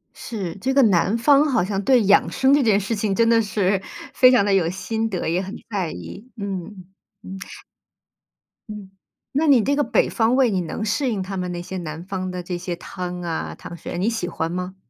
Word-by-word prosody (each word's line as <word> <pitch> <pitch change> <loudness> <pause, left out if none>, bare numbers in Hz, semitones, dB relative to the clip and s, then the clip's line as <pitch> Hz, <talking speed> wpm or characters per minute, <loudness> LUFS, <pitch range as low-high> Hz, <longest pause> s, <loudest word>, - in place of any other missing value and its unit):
是， 195 -8 -5
这 260 +7 -1
个 275 - +5
南 200 +1 +3
方 285 +4 +5
好 245 -8 +2
像 195 +1 -2
对 250 -2 +4
养 200 +1 +4
生 265 +1 +3
这 285 -2 +4
件 210 -3 +3
事 210 +3 -2
情 205 -1 -1
真 230 0 +3
的 230 -1 +5
是， 195 -2 0 0.3
非 255 0 +6
常 245 -6 +4
地 200 - +2
有 175 -4 +2
心 220 +4 -3
得， 180 -5 -3
也 175 +3 0
很 195 +2 -7
在 190 -6 -2
意， 90 - -9
嗯， 195 -1 -6 0.4
嗯。 190 +1 -8 1.3
嗯， 200 -2 -9 0.4
那 300 +3 +1
你 255 -7 +5
这 280 +1 +1
个 290 - +2
北 - - +1
方 230 +1 +2
胃， 255 -4 +3
你 185 -2 0
能 175 +6 -4
适 255 +5 0
应 200 -4 -2
他 195 +1 -6
们 180 -1 -3
那 175 - -4
些 185 +2 -6
南 165 0 -6
方 185 -1 -4
的 180 -1 -5
这 180 0 -4
些 175 0 -4
汤 180 0 -6
啊、 165 -2 -4
糖 170 - -9
水， 175 - -7
你 205 +6 +1
喜 225 -6 -3
欢 165 0 -3
吗？ 180 +1 -4
195 Hz, 235 characters per minute, -22 LUFS, 180-230 Hz, 1.3 s, 非